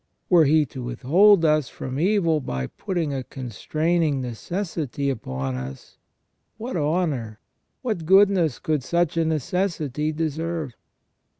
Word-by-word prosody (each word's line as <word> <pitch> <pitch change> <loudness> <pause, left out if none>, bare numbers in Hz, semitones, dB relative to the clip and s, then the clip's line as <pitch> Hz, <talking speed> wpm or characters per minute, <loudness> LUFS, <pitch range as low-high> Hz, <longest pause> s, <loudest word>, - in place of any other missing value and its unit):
Were 170 -3 +7
He 155 +1 +4
to 130 0 -8
withhold 165 - +4
us 150 -4 +2
from 130 +1 -5
evil 175 -3 +2
by 65 - -3
putting 170 - -3
a 135 -1 -3
constraining 150 - -1
necessity 140 - -3
upon 65 - -4
us, 65 +1 -8 0.6
what 235 +3 -5
honour, 145 -9 -1 0.4
what 210 -10 -2
goodness 190 -6 +4
could 155 -4 -1
such 170 +2 0
a 165 - +2
necessity 155 -2 -1
deserve 160 -2 -3
155 Hz, 120 wpm, -24 LUFS, 130-170 Hz, 0.6 s, Were